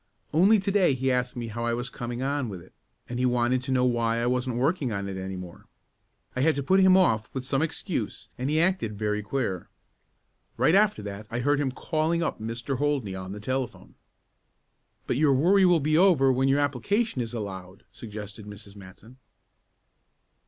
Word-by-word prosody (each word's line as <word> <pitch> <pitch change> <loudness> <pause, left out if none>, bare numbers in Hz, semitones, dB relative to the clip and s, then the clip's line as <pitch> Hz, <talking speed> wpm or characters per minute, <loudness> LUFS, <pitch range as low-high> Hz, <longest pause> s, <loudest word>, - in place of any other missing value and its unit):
Only 195 +8 +5
to 195 0 -1
day 185 -8 +3
he 130 +1 0
asked 125 0 -1
me 120 -2 -5
how 115 +2 -5
I 120 0 0
was 120 +2 -5
coming 120 +1 -5
on 140 -3 -1
with 95 -3 -7
it, 85 - -17 0.3
and 120 0 -4
he 130 - +2
wanted 125 +1 +1
to 130 +1 -4
know 125 -1 +3
why 115 -2 +1
I 120 - 0
wasn't 125 0 0
working 135 +1 0
on 100 -1 -3
it 95 - -5
any 95 0 -5
more. 90 -2 -10 0.7
I 130 - -1
had 160 +3 +3
to 140 - -2
put 190 +8 +3
him 190 0 +6
off 110 - +2
with 130 -1 -3
some 135 +1 +1
excuse 160 - -3
and 130 +2 -3
he 155 +1 +2
acted 165 - 0
very 105 0 -1
queer. 105 -6 -3 0.9
Right 160 - +3
after 205 - +3
that 100 +1 -7
I 120 +1 -3
heard 145 +3 +2
him 140 -2 0
calling 160 +5 -1
up - - -2
Mr. 115 +4 -4
Holdney 140 -9 0
on 95 0 -6
the 105 - -6
telephone." 130 +3 -4 1.1
"But - - -1
your 145 -2 +4
worry 185 +8 +4
will 175 -2 +5
be 155 +2 +2
over 165 -8 +5
when 130 +1 +1
your 140 +2 +3
application 145 - 0
is 115 0 -5
allowed," 95 -3 -7
suggested 105 -1 -9
Mrs. 105 -1 -12
Matson. 100 +5 -14
125 Hz, 195 wpm, -26 LUFS, 110-145 Hz, 1.1 s, him